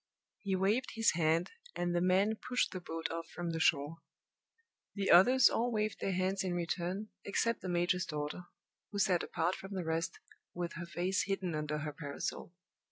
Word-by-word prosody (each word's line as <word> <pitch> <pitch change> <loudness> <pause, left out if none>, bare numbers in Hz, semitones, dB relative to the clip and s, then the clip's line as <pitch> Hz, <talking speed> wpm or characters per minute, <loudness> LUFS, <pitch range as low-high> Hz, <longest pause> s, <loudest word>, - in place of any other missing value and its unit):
He 195 -2 -1
waved 205 +7 +1
his 225 0 +4
hand, 165 +1 +1 0.2
and 175 0 -1
the 175 - +2
men 190 +4 +3
pushed 250 +2 -1
the 185 - -5
boat 165 -1 -4
off 165 0 -4
from 175 -1 -4
the 165 - -2
shore. 155 0 +2 1.0
The 200 -1 +1
others 245 +9 +8
all 240 +2 +1
waved 215 -1 -1
their 195 - -1
hands 185 +2 0
in 180 -2 -1
return 175 +4 -2
except 230 +3 0
the 185 - -4
major's 175 +1 +1
daughter, 150 +3 -4 0.5
who 205 - -4
sat 185 -3 +3
apart 170 +3 0
from 195 +1 -7
the 180 -3 -3
rest, 165 +1 -1 0.4
with 175 -1 -3
her 170 0 -6
face 175 +3 0
hidden 190 -3 -1
under 150 0 -2
her 150 0 -4
parasol. 145 +2 -5
180 Hz, 180 wpm, -33 LUFS, 165-195 Hz, 1.0 s, others